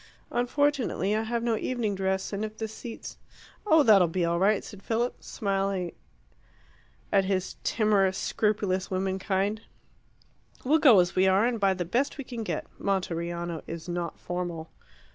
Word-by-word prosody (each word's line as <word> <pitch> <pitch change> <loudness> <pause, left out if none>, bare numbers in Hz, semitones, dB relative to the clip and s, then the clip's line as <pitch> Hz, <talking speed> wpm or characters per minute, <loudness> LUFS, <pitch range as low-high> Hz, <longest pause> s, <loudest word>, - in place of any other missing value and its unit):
"Unfortunately 245 -5 +1
I 215 - +1
have 230 +1 -2
no 235 -1 +1
evening 225 -2 -1
dress; 190 +1 -1
and 200 +2 -2
if 215 0 -5
the 220 - -3
seats 225 +2 -9 0.2
" - - -22
"Oh, 320 -5 +6
that'll 200 -7 +6
be 170 +1 0
all 170 0 0
right," 200 +2 +3
said 205 - -10
Philip, 235 +4 -1
smiling 195 -3 -2 1.2
at 195 -1 +4
his 190 -1 -1
timorous, 200 -4 +2
scrupulous 205 -3 0
women 190 0 -1
kind. 200 +2 -1 1.0
"We'll 300 +5 +3
go 250 -11 +7
as 175 - -2
we 185 +1 +4
are, 190 +3 +4
and 240 -2 0
buy 195 -1 +3
the 180 -1 -3
best 250 - 0
we 280 - -4
can 240 -2 -6
get. 215 - -3
Monteriano 175 -3 -2
is 165 +1 -7
not 175 -1 -3
formal." 175 -2 -4
195 Hz, 160 wpm, -27 LUFS, 185-225 Hz, 1.2 s, go